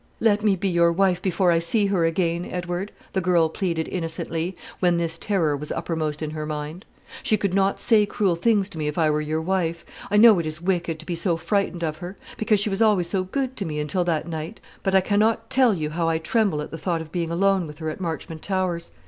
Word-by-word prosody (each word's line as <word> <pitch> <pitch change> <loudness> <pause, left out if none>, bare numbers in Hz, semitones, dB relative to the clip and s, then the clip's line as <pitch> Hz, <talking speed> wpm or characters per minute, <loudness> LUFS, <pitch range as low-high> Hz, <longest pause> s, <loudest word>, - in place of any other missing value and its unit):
"Let 210 -2 +2
me 205 -3 +4
be 195 +2 -2
your 170 -2 +3
wife 180 0 +2
before 185 -1 +2
I 165 - +3
see 200 +6 +1
her 190 -4 +2
again, 170 +1 0
Edward," 180 +2 -4 0.2
the 190 - +1
girl 175 -3 +3
pleaded 165 -2 -2
innocently, 165 0 -3 0.2
when 175 -2 +3
this 165 -1 -2
terror 170 -8 +1
was 145 +1 -6
uppermost 155 -2 -2
in 155 - -3
her 155 -1 -4
mind. 155 +5 -5 0.4
"She 215 - +2
could 200 -3 -1
not 195 0 +2
say 215 -3 +4
cruel 195 -4 +1
things 200 +2 +2
to 165 - -8
me 150 - -1
if 150 - -3
I 160 -2 +3
were 150 0 0
your 155 +1 -2
wife. 170 -2 -1 0.2
I 205 - +2
know 215 -3 +8
it 165 - -2
is 155 +1 -2
wicked 175 -2 -1
to - - -14
be 175 - -3
so 170 0 0
frightened 175 0 -1
of 155 -1 -2
her; 180 +3 -8 0.2
because 215 -1 +2
she 205 +1 +2
was 195 +3 -1
always 200 -6 +3 0.2
good 265 -2 -1
to 200 - -2
me 155 -4 -3
until 150 +5 0
that 165 -1 -1
night: 160 +5 -5 0.2
but 195 -1 0
I 190 - +6
cannot 220 +4 +1
tell 260 -2 +5
you 155 -3 -3
how 165 +1 0
I 165 - +1
tremble 165 -2 0
at - - -9
the 160 - -6
thought 170 -3 -1
of 160 -1 -10
being 170 -2 -2
alone 190 +1 +2
with 150 0 -10
her 160 -1 -3
at 170 - -9
Marchmont 165 -1 -4
Towers. 185 -3 -1
175 Hz, 240 wpm, -24 LUFS, 160-195 Hz, 0.4 s, know